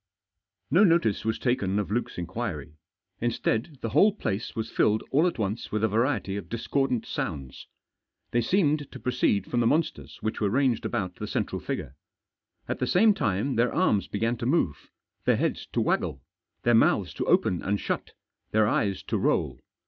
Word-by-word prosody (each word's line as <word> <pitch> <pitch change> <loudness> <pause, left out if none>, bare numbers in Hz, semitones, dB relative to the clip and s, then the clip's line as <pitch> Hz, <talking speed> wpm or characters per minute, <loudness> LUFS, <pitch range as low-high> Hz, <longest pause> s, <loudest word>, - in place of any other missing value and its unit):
No 175 +8 +6
notice 165 - +3
was 110 0 0
taken 105 -6 0
of 105 -1 -2
Luke's 120 +3 -2
inquiry. 85 - -4 0.5
Instead, 120 +4 -1
the 115 - -2
whole 205 - +5
place 110 - -3
was 110 -1 -3
filled 110 +1 +2
all 155 +6 +4
at 175 - -2
once 105 0 -3
with 110 0 -1
a - - +5
variety 110 -2 0
of 100 - -7
discordant 125 +1 -1
sounds. 65 -2 -5 0.6
They 120 - +2
seemed 150 - +1
to 130 - -9
proceed 105 -6 +1
from 120 - -1
the 115 - +3
monsters 75 - -1
which 110 - -3
were 105 - +2
ranged 125 0 +1
about 95 -7 -3
the - - -5
central - - -2
figure. 65 - -4 0.7
At - - -3
the - - 0
same 210 +4 +5
time 110 - -1
their 120 +1 +3
arms 110 - +2
began 115 +3 -1
to 120 +1 -3
move, 130 - 0 0.4
their - - +3
heads - - -1
to - - -2
waggle, 65 - -1 0.4
their 120 - +4
mouths 115 - +3
to - - -3
open 90 - +2
and 100 +1 -1
shut, - - -3 0.4
their 110 -1 +3
eyes 100 -3 0
to - - -1
roll. - - 0
115 Hz, 180 wpm, -27 LUFS, 100-135 Hz, 0.7 s, No